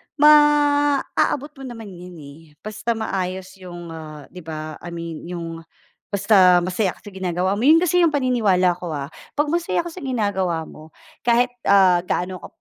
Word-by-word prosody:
maaabot 290 -1 +3
mo - - -8
naman 225 -4 -9
'yon, 180 0 -11
eh, 140 +2 -12 0.2
basta 215 +2 -3
maayos 190 -3 -4
'yong, 175 -2 -9
ah, 155 -2 -9
'di 180 -3 -12
ba, 155 -1 -6
I 175 -1 -8
mean 165 -1 -7
'yong 170 -2 -6 0.5
basta 190 -3 +4
masaya 185 +1 -1
ka - - -23
sa 205 - -10
ginagawa 185 0 -2
mo 250 - +2
'yon 330 +3 +6
kasi 360 +1 +2
'yong 330 -4 +3
paniniwala 200 -10 +2
ko, 170 -4 -5
ah, 140 +2 -5 0.2
pag 295 0 0
masaya 340 0 0
ka 345 - -7
sa 365 - -9
ginagawa 200 -10 -1
mo 155 0 -13 0.3
kahit, 245 +1 +2 0.2
ah, 185 -3 +5
gaano 185 +1 -2
ka - - -10
190 Hz, 170 wpm, -21 LUFS, 175-255 Hz, 0.5 s, yon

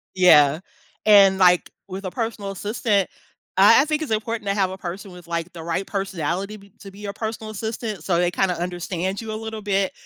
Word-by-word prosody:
Yeah, 155 -5 +6 0.5
and, 200 -2 +7
like, 180 -2 +4 0.2
with 190 +1 -7
a 185 - -3
personal 225 -2 -4
assistant, 205 0 0 0.5
I 205 +7 +7
I - - 0
think 305 0 -1
it's 310 - -5
important 220 0 -2
to 200 - +1
have 195 -2 +1
a 190 - -7
person 190 +2 -7
with, 180 -1 -13
like, 170 +1 -3
the 170 -1 -9
right 170 +4 -2
personality 195 0 -3
be 200 -1 -17
to 200 - -10
be 195 - -16
your 205 -1 -5
personal 220 +1 -5
assistant, 220 0 -5
so 175 -3 +1
they, 175 0 +2
kinda, 180 0 0
understand 180 +2 -3
you 220 -1 -6
a - - -3
little 220 -1 -6
bit, 195 -1 0
195 Hz, 210 wpm, -22 LUFS, 180-215 Hz, 0.5 s, and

